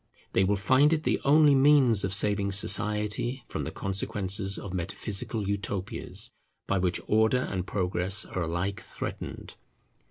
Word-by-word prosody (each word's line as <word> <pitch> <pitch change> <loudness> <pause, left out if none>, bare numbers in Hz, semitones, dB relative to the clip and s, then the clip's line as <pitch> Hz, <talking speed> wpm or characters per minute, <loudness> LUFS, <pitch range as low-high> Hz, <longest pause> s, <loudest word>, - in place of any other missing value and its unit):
They 95 - +3
will 100 +2 +2
find 130 +9 +3
it 155 -1 -1
the - - 0
only 150 +1 +5
means 135 -6 +5
of 95 - -1
saving 100 0 +2
society 105 +4 0
from - - -4
the - - -5
consequences 100 +1 -2
of 95 - -7
metaphysical 100 +3 -3
Utopias, 100 -1 -3 0.3
by 95 - 0
which 90 -1 0
Order 110 +4 +2
and 95 -5 -4
Progress 95 +1 0
are 95 - -5
alike 85 +4 -3
threatened. - - -7
100 Hz, 145 wpm, -27 LUFS, 95-115 Hz, 0.3 s, only